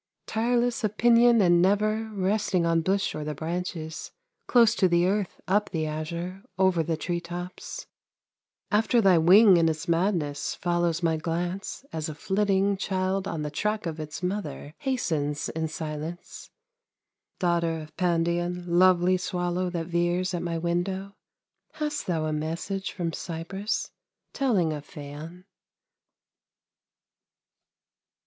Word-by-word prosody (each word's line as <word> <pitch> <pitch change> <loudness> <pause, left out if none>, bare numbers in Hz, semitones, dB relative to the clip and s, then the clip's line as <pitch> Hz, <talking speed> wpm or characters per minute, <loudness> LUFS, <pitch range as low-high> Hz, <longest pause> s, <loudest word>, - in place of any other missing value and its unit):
Tireless 240 +1 0
of 215 0 -1
pinion 235 -1 +6
and 175 -1 +5
never 215 +3 +2
Resting 195 -2 +1
on 165 0 +2
bush 195 +4 0
or 155 - -4
the 150 0 -4
branches, 160 0 -4 0.4
Close 235 -3 +5
to 190 - +3
the 175 0 +3
earth, 195 0 -1
up 205 +1 +2
the 160 -2 -2
azure, 170 +5 -4 0.2
Over 190 -3 +3
the 165 0 -1
treetops; 175 +2 -5 0.9
After 220 +3 +3
thy 190 -6 +5
wing 190 +4 +7
in 165 -1 +4
its 155 -1 -4
madness 165 -5 0
Follows 175 -1 0
my 160 -1 +2
glance, 175 - -3
as 160 -1 -3
a 155 - -6
flitting 195 +3 +1
Child 190 0 -1
on 160 -5 -3
the 150 - -4
track 210 +6 -1
of 160 -1 -4
its 155 +3 -6
mother 180 -6 -4
Hastens 155 - -1
in 160 0 -2
silence. 155 +1 -6 0.9
Daughter 170 -2 +1
of 155 0 -11
Pandion, 175 0 0
lovely 180 +1 +4
Swallow 180 0 -1
that 170 -2 -3
veers 175 +2 0
at 175 - -2
my 170 -1 -2
window, 180 +4 -2 0.6
Hast 300 -1 -3
thou 165 -3 0
a 155 - -1
message 165 +6 -3
from 170 -3 -3
Cyprus 190 +5 -4 0.4
Telling 205 - +1
of 150 -1 -6
Phaon? 155 +4 -9
175 Hz, 130 wpm, -27 LUFS, 165-195 Hz, 0.9 s, wing